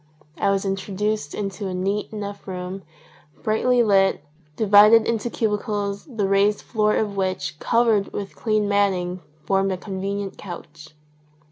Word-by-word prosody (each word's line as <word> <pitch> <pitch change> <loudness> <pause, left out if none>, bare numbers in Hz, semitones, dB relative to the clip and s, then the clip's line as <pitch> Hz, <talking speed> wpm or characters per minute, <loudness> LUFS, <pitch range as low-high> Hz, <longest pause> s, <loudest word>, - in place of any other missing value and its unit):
I - - +2
was 195 0 0
in 195 0 0
troduced 200 -3 -3
into 200 -1 -4
a 185 - -4
neat 195 +4 -2
enough 205 -2 -7
room, 185 +1 -5 0.6
brightly 240 +3 +3
lit, 195 -6 +3 0.3
divided 215 +3 +6
into 230 +1 -1
cubicles 210 -2 -2
the 225 -8 -2
raised 200 +1 +2
floor 215 -2 +1
of 210 -2 -1
which, 185 -6 -2
covered 230 -4 +2
with 200 -1 -6
clean 215 -2 0
matting, 185 -3 +1 0.2
formed 195 0 +1
a 185 - -2
convenient 195 +1 -4
couch. 165 -5 -10
200 Hz, 140 wpm, -23 LUFS, 190-210 Hz, 0.6 s, divided